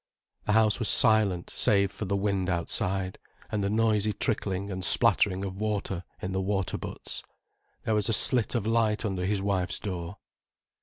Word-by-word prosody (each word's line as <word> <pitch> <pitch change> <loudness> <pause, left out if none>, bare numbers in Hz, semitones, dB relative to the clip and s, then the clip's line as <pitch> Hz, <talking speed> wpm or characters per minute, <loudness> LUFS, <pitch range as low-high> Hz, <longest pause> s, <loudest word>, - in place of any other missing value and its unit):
The 105 - +1
house 110 +1 +3
was 115 - +1
silent 105 -6 +3
save 100 -4 +2
for 110 - -5
the 100 +1 0
wind 100 -2 0
outside, 95 +2 -1 0.3
and 105 -2 -1
the 100 - 0
noisy 110 -1 +2
trickling 100 -2 -2
and 95 -1 -4
splattering 95 +2 +3
of 95 +1 -6
water 100 -4 -2 0.2
in 95 - -4
the 95 0 -1
water 95 -3 -1
butts. - - -6 0.6
There 110 - 0
was 105 +1 +1
a - - +2
slit 120 +1 +3
of 115 -4 0
light 110 -1 +1
under 95 -3 -2
his 100 -1 0
wife's 95 -2 0
door. 90 -1 -5
100 Hz, 170 wpm, -28 LUFS, 95-110 Hz, 0.6 s, house